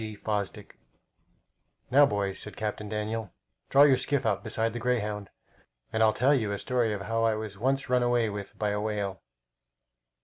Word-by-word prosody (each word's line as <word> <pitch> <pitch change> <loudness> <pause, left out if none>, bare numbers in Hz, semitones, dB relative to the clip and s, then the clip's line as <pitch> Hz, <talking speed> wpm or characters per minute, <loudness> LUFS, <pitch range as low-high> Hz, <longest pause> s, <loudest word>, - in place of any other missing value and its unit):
G. 110 -1 -5
Fosdick 105 -2 -4 1.1
"Now, 140 +2 +7
boys," 100 -4 -2
said 105 - -8
Captain 105 0 -3
Daniel, 105 -1 -3 0.4
"draw 140 +1 +7
your 140 -3 +6
skiff 135 -1 0
up 100 -3 0
beside 110 0 -1
the 120 - -4
Greyhound, 105 -5 -1 0.6
and 110 - +1
I'll 110 -1 +6
tell 130 +6 +3
you 110 -7 +1
a 100 - -2
story 120 0 0
of 105 -2 -3
how 115 +3 -1
I 110 -1 +3
was 110 -2 -5
once 135 +3 0
run 125 0 +2
away 120 -1 +2
with 100 -1 -6
by 105 - 0
a 105 0 -1
whale." 105 -3 -3
110 Hz, 180 wpm, -28 LUFS, 105-120 Hz, 1.1 s, Now